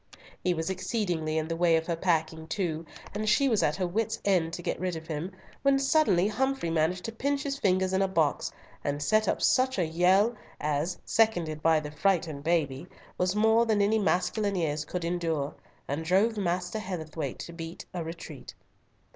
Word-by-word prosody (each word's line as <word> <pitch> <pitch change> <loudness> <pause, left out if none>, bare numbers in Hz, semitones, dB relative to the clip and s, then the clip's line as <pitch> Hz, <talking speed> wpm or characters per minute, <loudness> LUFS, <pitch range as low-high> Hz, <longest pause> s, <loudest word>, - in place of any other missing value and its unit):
He 180 -1 +2
was 160 +3 -2
exceedingly 175 -5 -1
in 160 0 -1
the 165 - -2
way 170 -1 +4
of 160 0 0
her 170 - -1
packing 160 -2 0
too, 165 -3 -2 0.3
and 215 +1 -1
she 275 +6 +4
was 225 -5 +2
at 150 - +2
her 185 - -1
wit's 205 +5 -1
end 180 -5 +2
to 175 - -5
get - - -2
rid 180 -1 -2
of 160 0 -7
him, 160 +3 -4 0.3
when 275 -1 +4
suddenly 270 - +3
Humfrey 265 -4 0
managed 165 +3 +1
to 225 - -3
pinch 280 +5 -1
his 275 -2 -3
fingers 190 -3 +2
in 190 - +2
a 195 - +3
box, 160 -6 +1 0.3
and 145 0 -1
set 215 +7 +3
up - - 0
such 260 -1 +3
a 180 - +2
yell, 185 +8 +3 0.2
as, 150 +4 -1
seconded 175 -9 +1
by 160 0 +4
the 150 -1 -7
frightened 160 -3 0
baby, 160 -2 0 0.3
was 180 +2 +1
more 220 +2 +4
than 215 -2 +2
any 210 +2 +3
masculine 200 +1 +1
ears 150 -4 -1
could 175 +2 -4
endure, 165 -4 -1 0.3
and 145 +4 -2
drove 195 +7 +3
Master 180 +1 -1
Heatherthwayte 165 -5 -4
to 170 - -8
beat 165 0 -7
a 175 -2 -3
retreat. 165 +1 -8
180 Hz, 190 wpm, -28 LUFS, 160-210 Hz, 0.3 s, way